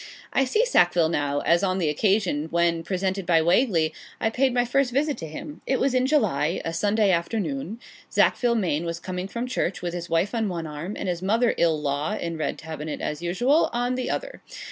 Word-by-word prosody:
I 270 - +3
see 430 - +2
Sackville 175 - +3
now, 145 -3 0
as 170 +1 +3
on 185 -2 0
the 175 -4 0
occasion 180 -1 +1
when, 170 0 +1
presented 190 +2 -2
by 165 -2 +5
Wagley, 170 -2 +2 0.3
I 220 - 0
paid 260 +3 +2
my 245 0 +2
first 265 +1 +1
visit 285 +3 +1
to 165 - -5
him. 290 - -8
It 265 - +1
was 270 -1 +1
in 255 0 +2
July 185 - +1
a 165 - -2
Sunday 205 +3 +2
afternoon 170 +1 -2 0.3
Sackville 240 -1 +2
Maine 170 -7 0
was 170 0 -3
coming 185 0 -4
from 235 +5 -4
church, 200 -8 -2
with 175 -1 -2
his 175 -1 -5
wife 165 +6 +1
on 225 -3 0
one 170 -3 -4
arm, 155 +6 -6
and - - -4
his 175 -1 -2
mother 225 +5 +2
ill 160 -2 +2
law 145 +6 -1
(in 170 -1 -3
red 155 -2 -2
tabinet, 155 -1 -6
as 150 - -4
usual,) 245 - +2
on 245 +1 0
the 255 0 -2
other. - - -4
185 Hz, 210 wpm, -25 LUFS, 165-240 Hz, 0.3 s, by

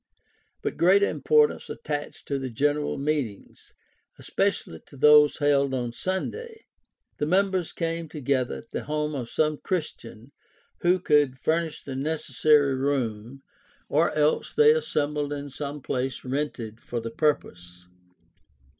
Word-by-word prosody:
But - - -3
greater 195 +4 +5
importance 450 -1 +2
attached 145 -1 -5
to 140 -1 -1
the 130 -1 -4
general 145 +5 0
meetings, 140 -7 -4 0.4
especially 80 - -1
to 140 - -14
those 150 +1 +6
held 140 -2 +2
on 120 -2 -3
Sunday. 440 - -4 0.5
The 150 - 0
members 190 0 +1
came 165 -1 -3
together 140 -4 -1
at 115 - -11
the - - -4
home 150 +1 -2
of 125 -5 -4
some 155 -1 +1
Christian 140 - -5 0.5
who 180 +1 +3
could 145 -6 +2
furnish 160 +4 -1
the 135 - -6
necessary 150 0 +2
room, 130 -2 -2 0.5
or - - +3
else 150 0 +1
they 450 0 +7
assembled 150 - -1
in 145 -1 -5
some 145 0 -6
place 130 0 -3
rented 125 -5 -3
for 120 - -4
the 115 0 -6
purpose. 90 - -2
145 Hz, 130 wpm, -26 LUFS, 130-155 Hz, 0.5 s, they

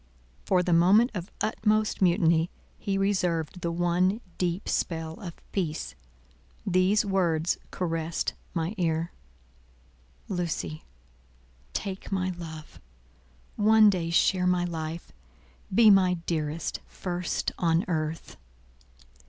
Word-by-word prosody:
For 180 -2 +3
the 175 - +1
moment 195 +9 +5
of 185 -1 -5
utmost 215 -1 +1
mutiny, 170 -2 +3 0.3
he 200 -2 -1
reserved 180 -4 0
the 170 - -1
one 175 +4 +1 0.2
deep 180 +1 -1
spell 160 -1 -2
of 175 -3 -7 0.2
peace. 165 -6 -2 0.7
These 190 +3 +3
words 175 -4 +1
caressed 165 -2 -2 0.2
my 165 +3 -1
ear:— 165 0 0 1.2
"Lucy, 170 -4 -3 0.9
take 195 -1 -4
my 185 -1 0
love. 160 - -9 0.8
One 215 0 +6
day 170 -3 -2
share 180 +2 +3
my 180 -1 +2
life. 165 -1 -5 0.6
Be 215 +2 +7
my 185 -2 +5
dearest, 165 -2 -3
first 180 -1 -3
on 165 0 +2
earth." 160 -2 -3
175 Hz, 105 wpm, -27 LUFS, 165-190 Hz, 1.2 s, Be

